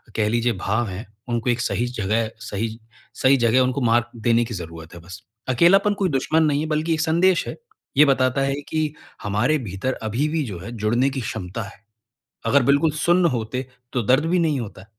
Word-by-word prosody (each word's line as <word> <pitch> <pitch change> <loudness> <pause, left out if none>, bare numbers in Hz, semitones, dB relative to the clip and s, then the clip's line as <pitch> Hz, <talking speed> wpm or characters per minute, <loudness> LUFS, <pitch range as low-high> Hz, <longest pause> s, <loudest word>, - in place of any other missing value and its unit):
कह 105 -1 +1
लीजिए, 120 +2 +1
भाव 105 +4 -1
हैं, 95 +6 -6 0.2
उनको 120 0 -1
एक 120 0 +1
सही 120 - 0
जगह, 110 -1 -1
सही 110 +1 -4 0.4
सही 135 +1 +5
जगह 120 +1 +3
उनको 130 +2 0
मार्ग 120 0 +3 0.2
देने 120 +1 +3
की 115 - -7
ज़रूरत 80 -3 -8
है 85 - -10
बस। 90 +3 -11 0.3
अकेलापन 195 +10 +4
कोई 190 - +2
दुश्मन 155 +4 +1
नहीं 145 -2 +2
है, - - -2
बल्कि 155 +2 0
एक 155 - 0
संदेश 170 +3 +3
है। - - -5 0.4
ये 150 - +8
बताता 130 -1 +2
है 135 0 +1 0.2
कि 155 - 0 0.4
हमारे 105 +10 +1
भीतर 100 +8 -2
अभी 125 +8 0
भी 155 -1 0
जो 95 -6 -6
है, 115 +6 -8
जुड़ने 120 +6 +1
की 135 -1 -4
क्षमता 95 0 -5
है। 100 0 -13 0.6
अगर 140 -1 +4
बिल्कुल 140 +5 +3
सुन्न 175 +1 +4
होते, 120 +3 -3 0.3
तो 125 - 0
दर्द 130 +8 +3
भी 180 +2 +2
नहीं 155 -5 +1
होता। 100 -3 -8
125 Hz, 200 wpm, -22 LUFS, 110-150 Hz, 0.6 s, ये